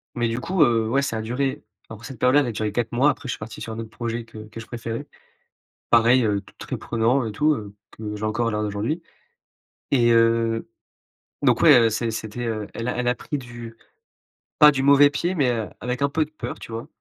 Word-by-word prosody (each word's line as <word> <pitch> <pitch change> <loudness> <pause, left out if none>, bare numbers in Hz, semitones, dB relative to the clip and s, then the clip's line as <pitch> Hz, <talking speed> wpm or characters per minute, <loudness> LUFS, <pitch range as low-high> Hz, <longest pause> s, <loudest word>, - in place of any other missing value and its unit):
mais 120 -1 0
du 115 +1 -2
coup, 175 +4 +2
heu, 115 -4 +2
ouais, 135 +4 +2
ça 115 -5 -2
a - - -3
duré. 130 +4 -2 0.3
Alors, 110 0 -10
cette 135 -3 -8
période-là, 125 +3 +5
elle 135 - -1
a - - -2
duré 110 -1 -2
4 115 +1 -2
mois. 130 +5 +4
Après, 140 - -9
je 125 - -1
suis 110 - -9
parti 110 +1 -8
sur 115 - -5
un 110 - -6
autre 115 -1 -6
projet 115 0 -4
que 115 -1 -12
que 115 - -9
je 115 - -8
préférais. 115 -1 -6 0.8
Pareil, 120 +2 +5
heu, 105 -2 +1
t - - -19
très - - -5
prenant 120 +3 +1
et 110 - -3
tout, 150 +8 +2
heu, 105 -5 -8 0.2
que 105 -1 -6
j'ai 105 - -7
encore 110 +2 0
à - - -3
l'heure 105 0 -1
d'aujourd'hui. 105 +11 -2 0.9
Et 120 -3 +4
heu, 115 0 +2 0.7
donc, 125 -4 +3
ouais, 150 -6 +8
heu, 115 -1 +4
c'est 115 +1 -1
c'était, 110 +2 -5
heu, 110 -3 -3
elle 115 - -5
l'a 125 - -2
elle 125 - -1
l'a 125 0 +2
pris 145 - -4
du 120 -3 -9 0.8
pas 150 -1 +9
du 135 -2 -2
mauvais 140 +1 +7
pied, 175 +5 -1
mais, 135 -7 +2
heu, 115 -3 -3
avec 125 +2 -3
un 140 - +2
peu 155 +2 0
de 150 - -21
peur, 130 -6 -6
tu - - -10
vois, 115 +1 -6
115 Hz, 245 wpm, -23 LUFS, 110-130 Hz, 0.9 s, pas